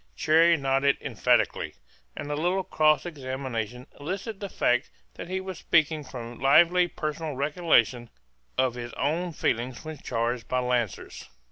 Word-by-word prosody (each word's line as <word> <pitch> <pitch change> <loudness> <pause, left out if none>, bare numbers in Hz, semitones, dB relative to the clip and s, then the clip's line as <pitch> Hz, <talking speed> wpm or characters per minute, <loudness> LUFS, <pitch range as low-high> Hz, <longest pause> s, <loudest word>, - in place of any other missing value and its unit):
Cherrie 165 - +4
nodded 135 0 +2
emphatically; - - +1 0.4
and 145 - -5
a - - 0
little 180 +5 0
cross 155 -2 +3
examination 130 -6 -4
elicited 195 +7 -5
the 200 - -5
fact 125 -4 +1 0.2
that - - -8
he 190 0 -1
was 190 -2 -7
speaking 155 -2 +2
from 120 -3 -8
lively 170 +6 +5
personal 155 -2 -4
recollection 135 -5 +2 0.5
of 130 -2 +2
his 120 -1 -7
own 170 +5 -1
feelings 125 -2 -2
when 155 -2 -7
charged 120 0 -2
by 130 - -1
lancers. 125 -4 -2
145 Hz, 140 wpm, -27 LUFS, 125-165 Hz, 0.5 s, lively